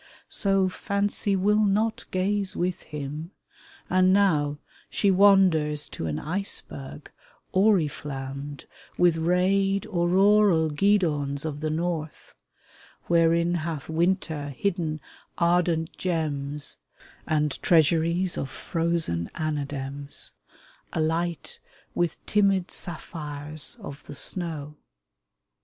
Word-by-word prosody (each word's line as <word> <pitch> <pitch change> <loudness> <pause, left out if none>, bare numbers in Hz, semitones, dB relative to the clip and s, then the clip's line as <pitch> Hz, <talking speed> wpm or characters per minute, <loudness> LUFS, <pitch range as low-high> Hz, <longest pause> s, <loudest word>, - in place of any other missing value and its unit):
So 195 -1 +2
Fancy 200 +1 -1
will 210 +3 +3
not 210 +2 +1
gaze 195 +1 0
with 180 0 -1
him, 150 +2 -6 0.6
and 185 0 +4
now 155 -7 +3 0.3
She 200 - +2
wanders 180 -7 +4
to 80 - -5
an 75 - -2
iceberg 155 -5 -4 0.4
oriflammed 145 -7 0 0.3
With 175 -2 +4
rayed, 190 +4 +2
auroral 185 -1 +3
guidons 150 -5 +1
of 150 -2 -4
the 155 +1 -2
North 160 -1 -3 0.4
— - - -26
Wherein 170 0 +3
hath 160 -4 -3
winter 160 -3 0
hidden 170 -6 -1 0.4
ardent 170 -1 +1
gems 150 -5 -2 0.5
And 150 -2 0
treasuries 170 +2 +3
of 135 - -3
frozen 165 - -1
anadems, 145 -2 -4 0.6
Alight 165 0 -2 0.3
with 175 -2 -2
timid 195 -3 +2
sapphires 155 -1 -4
of 145 -9 -9
the 145 - -7
snow. 150 -3 -4
165 Hz, 95 wpm, -26 LUFS, 150-185 Hz, 0.6 s, and